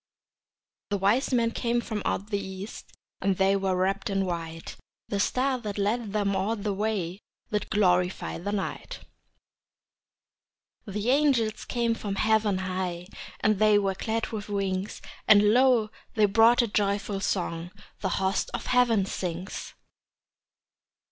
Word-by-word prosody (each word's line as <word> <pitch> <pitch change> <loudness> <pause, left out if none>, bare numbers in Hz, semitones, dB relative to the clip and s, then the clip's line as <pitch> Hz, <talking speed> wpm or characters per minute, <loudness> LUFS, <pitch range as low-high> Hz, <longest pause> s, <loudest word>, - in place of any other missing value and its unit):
The 205 - 0
wise 205 +9 +2
men 235 -2 +2
came 235 0 0
from 220 -3 -4
out 205 +3 -2
the 200 - +1
east, 190 +2 -8 0.3
And 195 -2 +1
they 195 0 +3
were 190 -1 0
wrapped 195 +4 0
in 195 -1 0
white; 165 -2 -5 0.3
The 200 - -1
star 255 +5 +1
that 210 -4 -5
led 210 +2 0
them 200 -1 0
all 195 +4 0
the 205 -1 -2
way 195 -3 -2 0.3
Did 210 0 -1
glorify 180 -4 +1
the 200 +4 -3
night. 205 -2 -4 1.9
The 210 +4 -1
angels 260 -7 +2
came 235 -1 0
from 205 -3 -4
heaven 215 -1 +2
high, 185 -1 -3 0.3
And 215 -2 +2
they 215 -1 +5
were 195 -1 +1
clad 220 +4 -2
with 215 -2 -6
wings; 195 -1 -2 0.2
And 210 0 +7
lo, 245 -4 +4 0.2
they 215 -2 +5
brought 225 +4 +5
a - - 0
joyful 200 -1 0
song 175 -3 -2 0.3
The 190 - -1
host 190 +2 0
of 240 - -5
heaven 240 -5 +3
sings. 180 0 -5
205 Hz, 140 wpm, -27 LUFS, 190-220 Hz, 1.9 s, And